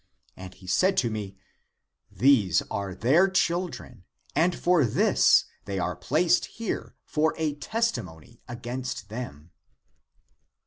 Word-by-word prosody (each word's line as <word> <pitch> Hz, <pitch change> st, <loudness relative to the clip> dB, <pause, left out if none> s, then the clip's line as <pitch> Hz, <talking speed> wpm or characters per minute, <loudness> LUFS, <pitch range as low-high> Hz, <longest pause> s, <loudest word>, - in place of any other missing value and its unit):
And 95 Hz, 0 st, -10 dB
he 95 Hz, -, -17 dB
said 185 Hz, -, +2 dB
to 120 Hz, -, +1 dB
me, 100 Hz, -3 st, -6 dB, 0.7 s
These 120 Hz, -10 st, +3 dB
are 100 Hz, -2 st, -3 dB
their 155 Hz, -, +4 dB
children 175 Hz, -, -2 dB, 0.3 s
and 170 Hz, +3 st, +2 dB
for 175 Hz, -3 st, +3 dB
this 185 Hz, -, +4 dB, 0.2 s
they 100 Hz, -1 st, -4 dB
are 90 Hz, -1 st, -2 dB
placed 155 Hz, -, +2 dB
here 225 Hz, -3 st, -5 dB
for 155 Hz, +1 st, 0 dB
a 155 Hz, -2 st, -1 dB
testimony 120 Hz, -, -3 dB
against 120 Hz, -2 st, -6 dB
them. 90 Hz, -, -8 dB
125 Hz, 120 wpm, -26 LUFS, -, 0.7 s, their